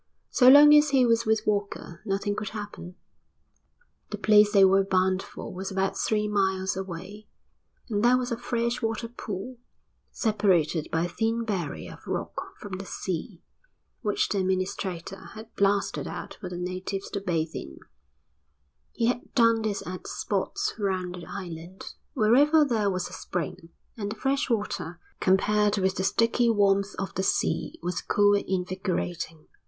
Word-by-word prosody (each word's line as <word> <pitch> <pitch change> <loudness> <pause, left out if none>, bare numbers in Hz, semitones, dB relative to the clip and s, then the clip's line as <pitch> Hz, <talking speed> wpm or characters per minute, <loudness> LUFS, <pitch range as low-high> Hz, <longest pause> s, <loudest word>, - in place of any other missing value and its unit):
So 250 -1 +6
long 295 +2 +9
as 300 0 +6
he 265 -3 +4
was 230 -1 +2
with 220 0 +2
Walker 200 -4 -2
nothing 200 +1 -1
could 210 -1 -4
happen. 205 -4 -8 1.1
The - - -4
place 210 -1 +5
they 200 -2 +7
were 195 +1 +5
bound 190 0 +1
for - - -9
was 190 +1 -5
about 190 0 -1
three 210 -1 0
miles 190 -2 0
away, 190 +3 -7 0.6
and 210 -3 -1
there 245 +1 +5
was 250 0 -3
a - - +1
fresh 240 0 -1
water 225 0 -2
pool, 230 +1 -7 0.5
separated 185 - +1
by 165 +1 +1
a - - -1
thin 225 +6 -1
barrier 180 -9 -4
of - - -16
rock - - -5
from 190 -2 -7
the 195 - -6
sea, 180 +1 -5 0.6
which 210 -4 0
the 200 - 0
administrator 185 -1 -2
had 220 +1 -11
blasted 200 0 +1
out - - -6
for 185 - -5
the 180 - -6
natives 185 +2 -4
to 200 - -3
bathe 165 -4 -1
in. 70 - -7 1.2
He 230 - 0
had 245 +1 -1
done 230 -3 +4
this 215 -2 -2
at 180 0 -7
spots 410 +1 -2
round 185 -3 -1
the 175 -1 -9
island, 180 -1 -8 0.2
wherever 285 +7 +5
there 220 -6 +1
was 185 -2 -2
a - - -12
spring; 170 0 -5 0.3
and 205 -2 -4
the - - -4
fresh 270 +5 0
water, 205 -6 -2 0.2
compared 210 +2 +3
with 190 -1 +1
the 190 - 0
sticky 230 +4 +2
warmth 200 -2 +2
of 190 - -4
the - - -1
sea, 190 - 0
was 175 0 -2
cool 205 0 +3
and 200 - +1
invigorating. 180 -3 -3
200 Hz, 160 wpm, -27 LUFS, 185-225 Hz, 1.2 s, long